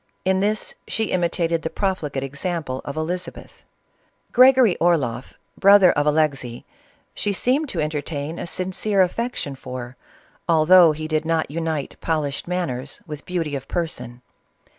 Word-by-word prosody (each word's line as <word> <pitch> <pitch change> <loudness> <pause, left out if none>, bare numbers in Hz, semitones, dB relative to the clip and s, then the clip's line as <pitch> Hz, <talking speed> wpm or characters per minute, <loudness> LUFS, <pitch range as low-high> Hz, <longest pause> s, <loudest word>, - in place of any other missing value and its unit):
In 190 0 +2
this 210 +2 -1
she 220 -2 -2
imitated 170 -2 0
the 160 - -3
profligate 160 -10 -2
example 140 -1 -3
of 140 +2 -6
Elizabeth. 170 +2 -5 0.7
Gregory 255 -5 +6
Orloff, 140 -8 0 0.2
brother 200 -2 +7
of 145 +1 0
Alexey, 140 -6 0 0.5
she 205 - -1
seemed 260 +9 0
to - - -3
entertain 150 +1 -3
a - - -5
sincere 190 +3 +1
affection 205 - -3
for, 125 -2 -8 0.5
although 165 +1 +7
he 155 +1 -5
did 155 -1 0
not 160 -2 -1
unite 160 -2 -3
polished 150 -3 -2
manners 145 -7 -3
with 150 -1 -9
beauty 165 -5 -2
of 135 - -6
person. 125 -8 -4
160 Hz, 135 wpm, -22 LUFS, 145-185 Hz, 0.7 s, brother